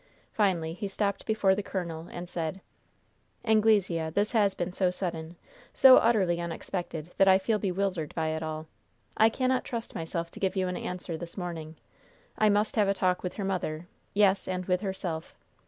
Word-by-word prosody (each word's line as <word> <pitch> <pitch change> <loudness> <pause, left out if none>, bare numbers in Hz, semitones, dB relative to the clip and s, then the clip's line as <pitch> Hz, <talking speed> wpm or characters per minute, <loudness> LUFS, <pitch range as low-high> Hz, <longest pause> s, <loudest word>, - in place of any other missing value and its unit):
Finally 175 -6 +1
he 200 +4 -4
stopped 200 0 -2
before 210 -3 +3
the 200 - -1
colonel, 170 -4 -5
and 175 0 -6
said: 170 +1 -3 0.9
"Anglesea, 210 -7 +3
this 205 +6 0
has 205 -4 +3
been 175 +1 -2
so 185 0 +1
sudden 170 -2 -4 0.4
so 260 -1 +9
utterly 190 -7 +3
unexpected 170 -1 -5
that 195 - +6
I 190 0 +7
feel 210 +3 0
bewildered 185 -5 -2
by 160 -1 0
it 160 0 -2
all. 155 0 -4 0.5
I 220 - +5
cannot 255 +2 0
trust 230 -1 -5
myself 170 +1 -4
to - - -11
give 190 0 0
you 190 -1 +1
an 180 - -2
answer 180 -2 -4
this 170 +3 -9
morning. 165 -3 -5 0.6
I 215 - +3
must 210 +2 +1
have 210 -2 +4
a 200 - +2
talk 185 -1 +1
with 180 - -4
her 200 - -3
mother 175 -4 -2 0.3
yes, 200 -1 +3
and 185 -1 -2
with 180 0 +1
herself. 185 -5 -4
185 Hz, 180 wpm, -28 LUFS, 170-200 Hz, 0.9 s, so